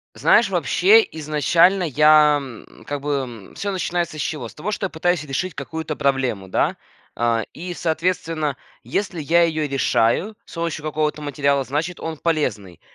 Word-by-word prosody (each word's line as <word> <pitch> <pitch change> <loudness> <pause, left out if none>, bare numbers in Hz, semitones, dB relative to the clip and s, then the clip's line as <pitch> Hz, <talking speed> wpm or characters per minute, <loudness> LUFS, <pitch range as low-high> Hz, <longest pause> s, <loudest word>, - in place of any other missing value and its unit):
Знаешь, - - +4
вообще 435 +4 +4
изначально 165 +5 +2
я, 150 0 +5
м, 125 -5 -12
как 145 -1 -4
бы, 145 +1 -2 0.4
м, - - -17
всё 200 - -3
начинается 175 -4 -2
с - - -3
чего? 135 -7 -3
С - - -15
того, 210 +8 -4
что 195 - -2
я - - -7
пытаюсь 175 0 0
решить 150 +5 -3
какую-то 160 -1 -5
проблему, 130 -9 -1
да? - - 0 0.4
А, 115 -1 +1
и 175 +1 -6
соответственно, 160 -3 -1 0.3
если 190 -5 -3
я 170 +4 +3
её 155 -3 -1
решаю 135 - +1
с - - -13
помощью 165 -2 -3
какого-то 150 0 -1
материала, 140 -1 +1
значит, 160 +7 -3
он 160 -1 -4
полезный, 110 - -2
155 Hz, 160 wpm, -21 LUFS, 140-170 Hz, 0.4 s, я